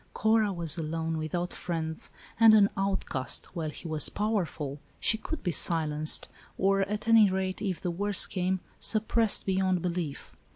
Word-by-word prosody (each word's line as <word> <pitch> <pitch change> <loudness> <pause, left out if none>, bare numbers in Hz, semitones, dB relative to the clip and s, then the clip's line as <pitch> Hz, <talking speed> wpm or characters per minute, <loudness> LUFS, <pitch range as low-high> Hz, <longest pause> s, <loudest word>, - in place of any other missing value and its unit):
Cora 220 -1 +2
was 170 -2 -2
alone, 160 0 -3
without 175 +3 -3
friends, 160 -2 -3 0.3
and 225 -1 +8
an 205 -1 +5
outcast, 190 -9 -1
while 160 -3 -3
he 160 - -9
was 155 -2 +2
powerful. 175 -9 -3 0.2
She - - +4
could 315 +7 -6
be 180 - 0
silenced, 155 -1 +2 0.3
or, 195 +1 +2
at 210 +3 -3
any 225 -3 +6
rate, 190 0 -3
if 190 -5 -2
the 175 - -2
worst 200 +3 +2
came, 185 0 -1 0.2
suppressed 220 0 +1
be 190 - 0
yond 185 -2 0
belief. 170 -5 -4
185 Hz, 160 wpm, -28 LUFS, 160-205 Hz, 0.3 s, and